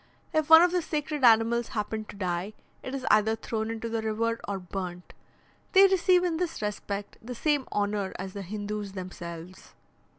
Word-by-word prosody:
If 310 0 +1
one 320 +1 +10
of 355 - +3
the 360 0 +1
sacred 300 -2 -3
animals 230 0 +5
happen 215 +1 -2
to - - -11
die, 185 +1 -3 0.3
it 260 - -5
is 260 -1 -5
either 215 +1 +4
thrown 220 0 -3
into 225 0 -4
the 225 -1 -2
river 230 +1 -1
or 200 -1 -2
burnt. 180 -1 -6 0.6
They 390 0 +8
receive 370 -1 +4
in 340 -3 0
this 340 -1 -3
respect 205 -1 -4
the 245 +2 -7
same 290 +1 0
honour 205 -1 -1
as 190 +1 -6
the 200 - -5
Hindoos 205 +1 -5
themselves. 180 -1 -9
220 Hz, 175 wpm, -28 LUFS, 200-275 Hz, 0.6 s, one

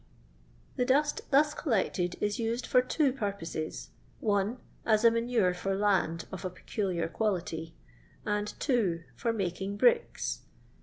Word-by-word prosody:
The 250 - +3
dust 290 +3 +1
thus 295 +1 +4
collected 190 - 0
is 210 +1 -1
used 230 +2 -1
for 250 - +4
two 275 +1 +1
pur 210 -7 -1
poses, 165 -4 -5 0.3
(1) 205 +2 +1 0.3
as 220 0 +3
a 230 - +8
manure 230 -5 +2
for 195 +2 -2
land 190 -5 +1
of 190 0 -6
a 185 - -1
peculiar 180 -2 -2
quality; 165 -4 -2 0.5
and 210 0 -1
(2) 200 - +1
for 235 - 0
making 195 -1 -2
bricks. 480 - +2
205 Hz, 140 wpm, -30 LUFS, 180-240 Hz, 0.5 s, a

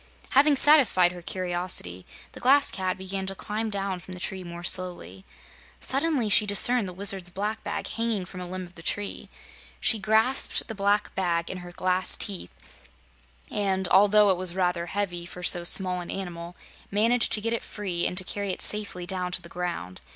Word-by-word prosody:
Having 285 +2 +5
satisfied 260 - +6
her 180 0 -10
curiosity, 175 - -3 0.2
the - - -11
Glass 275 +3 +4
Cat 185 -1 -3
began 190 0 -5
to 195 - -4
climb 215 +3 -4
down 195 -2 -3
from 185 +1 -10
the - - -10
tree 185 +1 -5
more 170 0 -9
slowly. 175 - -3 0.5
Suddenly 275 -3 0
she 210 +1 +5
discerned 210 +2 +3
the - - -9
Wizard's 190 -1 +1
black 210 +4 -4
bag - - -4
hanging 225 -4 -2
from 180 +1 -9
a 180 - -6
limb 185 +1 -6
of 175 - -17
the 165 - -12
tree. 205 +4 -3 0.5
She 225 - +3
grasped 220 +6 +2
the 225 - -6
black 205 0 0
bag 170 -3 -1
in 185 - -6
her 175 0 -10
glass 185 +1 +2
teeth, 195 - -3 1.0
and 190 -2 -1
although 205 +1 +5
it 185 - 0
was 180 -1 +1
rather 180 -2 -1
heavy 180 -3 -3
for 180 0 -10
so 175 0 +2
small 180 +1 +2
an 175 - -9
animal, 175 -2 -6 0.3
managed 230 +4 +3
to 210 - +6
get 230 +2 -1
it 230 - -2
free 185 -5 -2
and 180 - -5
to 185 - +4
carry 200 +2 -4
it 185 - 0
safely 205 -4 -1
down 180 0 -2
to 185 - -3
the 170 - -11
ground. 170 - -5
190 Hz, 190 wpm, -26 LUFS, 180-210 Hz, 1.0 s, satisfied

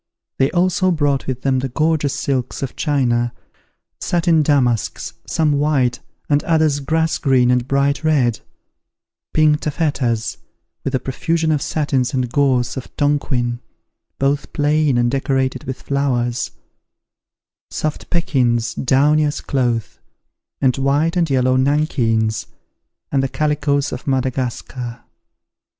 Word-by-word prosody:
They 135 0 +3
also 185 +1 +2
brought 145 -5 0
with 130 -1 -3
them 135 -1 +2
the 135 +1 -3
gorgeous 155 0 0
silks 135 -3 -2
of 135 - -4
China, 120 -5 +1 0.7
satin 170 -2 +2
damasks, 130 -6 0
some 160 -2 +1
white, 140 -4 +1 0.3
and 145 0 +2
others 155 -3 +2
grass 160 +3 0
green 130 -3 +3
and 125 0 +1
bright 140 +2 +1
red; 130 -8 +2 0.9
pink 155 -1 +3
taffetas, 140 -7 -1 0.5
with 135 - -3
the 130 - +2
profusion 160 +5 -1
of 150 -2 +1
satins 140 -4 0
and 125 -2 -1
gauze 130 -4 +1
of 130 - -6
Tonquin, 130 -5 0 0.6
both 140 +1 0
plain 150 -2 +2
and 120 0 +2
decorated 130 -1 -1
with 130 0 -6
flowers; 125 -4 0 1.2
soft 155 -1 -4
pekins, 125 -9 +1
downy 145 +4 +3
as 150 0 -1
cloth; 120 -6 -1 0.6
and 130 -2 +2
white 145 +5 +1
and 170 -3 +1
yellow 130 -1 +2
nankeens, 115 -6 +1 0.6
and 140 - +2
the 135 - -1
calicoes 145 0 0
of 125 - -7
Madagascar. 130 -2 -2
135 Hz, 125 wpm, -19 LUFS, 125-150 Hz, 1.2 s, They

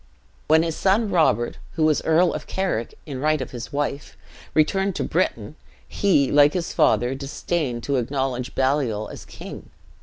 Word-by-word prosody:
"When 160 +1 +5
his 165 -1 -2
son 200 +2 +2
Robert 155 -8 +2
(who 160 - 0
was 155 -1 +3
Earl 165 +2 +3
of - - -6
Carrick 185 -12 -2
in 140 -4 -6
right 155 +2 +1
of 130 - -5
his 120 -1 -7
wife) 145 0 -3 0.4
returned 190 +5 +2
to - - -1
Britain, 150 - -1 0.3
he, 165 -9 +2
like 145 0 +5
his 175 -2 -3
father, 120 +4 +3
disdained 135 -2 -3
to 140 -1 0
acknowledge 125 0 -2
Baliol 130 -6 0
as - - -10
king. - - -10
145 Hz, 160 wpm, -23 LUFS, 130-165 Hz, 0.4 s, When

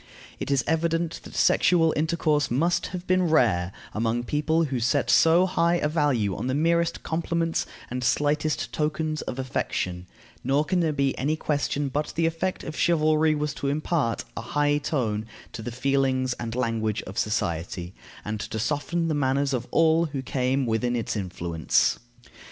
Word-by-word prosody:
It - - -4
is 140 -3 +2
evident 165 +1 0
that - - -11
sexual 165 -3 +4
intercourse 155 -1 +1
must 165 +8 +1
have 180 -1 -6
been 185 -2 +2
rare 100 - +3 0.2
among 115 +2 0
people 155 +5 +1
who 135 -5 -1
set 120 +1 +1
so 165 +3 +5
high 175 -2 +2
a 160 - +1
value 140 - +1
on - - -4
the 130 - 0
merest 170 +2 +1
compliments 165 0 -1 0.2
and 125 0 -3
slightest 150 +4 0
tokens 155 0 -1
of 125 - -5
affection; 90 -8 -3 0.4
nor 145 +3 +2
can 180 +3 +1
there 165 -2 +2
be 140 -2 0
any 150 +4 +1
question 145 -2 -1
but 145 +3 -2
the 165 - +1
effect 165 +3 -1
of 155 - -6
chivalry 155 -2 +3
was 150 -1 -2
to 140 - -4
impart 145 -3 0
a - - -4
high 145 +4 +1
tone 115 -8 -1 0.2
to - - -7
the 120 - -5
feelings 130 0 +1
and 115 -1 -4
language 115 -3 -1
of 95 - -5
society, 90 -3 -2 0.3
and 105 0 -3
to 110 - -5
soften 150 +8 -1
the 160 - 0
manners 140 -1 +1
of 125 -1 -2
all 165 0 +3
who 140 -4 -4
came 130 +1 0
within 120 +2 0
its 115 -1 -2
influence. 85 -4 0
145 Hz, 170 wpm, -25 LUFS, 120-160 Hz, 0.4 s, so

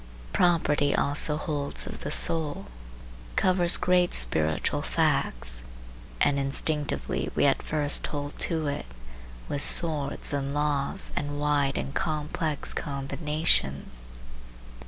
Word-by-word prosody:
Property 155 -5 +2
also 150 +1 +2
holds 145 -3 -2
of - - -7
the - - -5
soul, 155 -3 -1 0.7
covers 180 -2 +4
great 180 -1 +2
spiritual 75 +6 +2
facts, - - 0 0.6
and 140 -1 +2
instinctively 145 +2 -1
we - - +2
at - - +2
first 150 -2 +3
hold 145 -1 -5
to 160 -3 +2
it 145 - -4 0.6
with 145 - +1
swords 150 -4 +2
and 140 0 -2
laws 150 +5 -1
and 145 0 -3
wide 145 -2 0
and 135 - -4
complex 155 -1 -1
combinations. 135 - -2
145 Hz, 110 wpm, -26 LUFS, 140-155 Hz, 0.7 s, covers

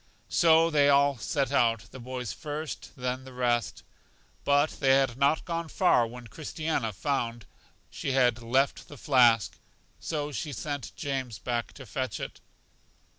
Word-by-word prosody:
So 165 0 +5
they 145 -2 +4
all 140 -2 +4
set 135 +3 -1
out, 115 -5 +3
the 130 - -10
boys 125 -1 -5
first, 155 -1 -6
then 125 0 -3
the 130 - -11
rest; 120 -2 -1 0.6
but 145 +2 +3
they 135 -2 +5
had 135 -3 +2
not 140 +4 +2
gone 170 -1 -3
far 155 -9 +3
when 120 +1 -10
Christiana 155 -2 -3
found 120 0 -2 0.5
she 135 - -3
had 120 -3 +3
left 130 +4 0
the 145 - -11
flask, 120 -7 +3 0.4
so 150 -2 -3
she 145 +1 -4
sent 140 -7 -5
James 130 -5 -3
back 120 -1 -3
to - - -11
fetch - - -3
it. - - -7
135 Hz, 150 wpm, -28 LUFS, 120-145 Hz, 0.6 s, So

